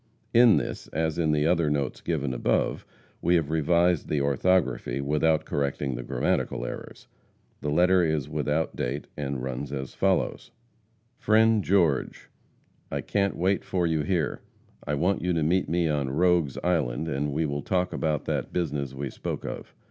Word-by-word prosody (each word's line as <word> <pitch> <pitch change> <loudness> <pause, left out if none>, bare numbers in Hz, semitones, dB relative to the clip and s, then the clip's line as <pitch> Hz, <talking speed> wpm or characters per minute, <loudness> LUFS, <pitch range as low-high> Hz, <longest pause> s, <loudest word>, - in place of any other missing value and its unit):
In 120 -2 +7
this, - - -4
as 80 +1 -2
in 80 -2 +2
the 75 0 +2
other 85 -2 +2
notes 70 -2 -2
given 70 -6 -1
above, - - 0 0.3
we 90 - +3
have 80 -3 0
revised 85 +2 +2
the 75 - 0
orthography, 70 +2 +1
without 75 +3 +1
correcting 70 -1 -1
the 60 - -4
grammatical - - -1
errors. - - -8 0.5
The 75 - -2
letter 90 +4 +4
is 80 -4 0
without 75 +1 -1
date, 70 +4 -3
and 70 -3 -3
runs 65 +2 -4
as 65 -2 -5
follows: 95 +6 0 0.7
FRIEND 110 -3 +4
GEORGE: 85 -9 +1 0.6
I - - -2
can't 100 -1 0
wait 95 +3 +1
for 90 -2 -1
you 80 -2 +1
here. 80 0 -1 0.5
I 75 - 0
want 90 +7 +1
you 90 0 0
to 80 -2 +1
meet 90 +1 +1
me 85 0 +1
on 70 -3 0
Rogues 85 -2 +2
Island, 80 -5 0
and 75 -1 -1
we 80 +3 0
will 70 -1 -2
talk 90 +2 -1
about 75 -3 -1
that - - -2
business 70 -6 -2
we 70 0 -4
spoke - - -5
of. - - -7
80 Hz, 165 wpm, -26 LUFS, 70-90 Hz, 0.7 s, In